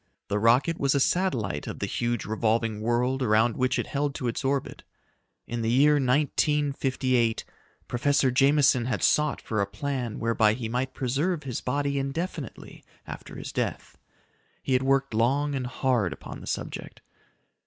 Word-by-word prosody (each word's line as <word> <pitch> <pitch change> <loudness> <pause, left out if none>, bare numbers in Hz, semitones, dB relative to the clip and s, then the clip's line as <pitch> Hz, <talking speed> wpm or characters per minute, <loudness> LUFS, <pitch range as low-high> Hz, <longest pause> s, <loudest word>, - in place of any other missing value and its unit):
The 105 0 0
rocket 125 +9 +3
was 140 0 +2
a - - +3
satellite 125 - 0
of - - -5
the - - -2
huge, 120 -2 -2
revolving 110 0 0
world 125 +4 0
around 115 -1 +3
which 130 0 +1
it - - -1
held 140 0 -2
to 125 - -3
its 115 - -2
orbit. 135 0 -1 0.6
In 120 0 -4
the 115 - 0
year 140 +5 +5
1958, 135 -3 +1 0.4
Professor 135 +1 +2
Jameson 135 -1 +4
had 125 - -2
sought 150 -1 +2
for 110 -2 -2
a 100 - 0
plan 130 -1 -3
whereby 115 -2 +2
he 120 -2 -4
might 125 +3 -2
preserve 150 +6 -1
his 130 -4 -4
body 140 +1 -1
indefinitely 140 0 -5 0.2
after - - -9
his - - -6
death. - - -4 0.6
He 130 - 0
had 130 - +3
worked 135 -1 +1
long 135 +6 +1
and 130 -2 -2
hard 125 - 0
upon - - -10
the - - -10
subject. - - -5
130 Hz, 160 wpm, -26 LUFS, 115-140 Hz, 0.6 s, year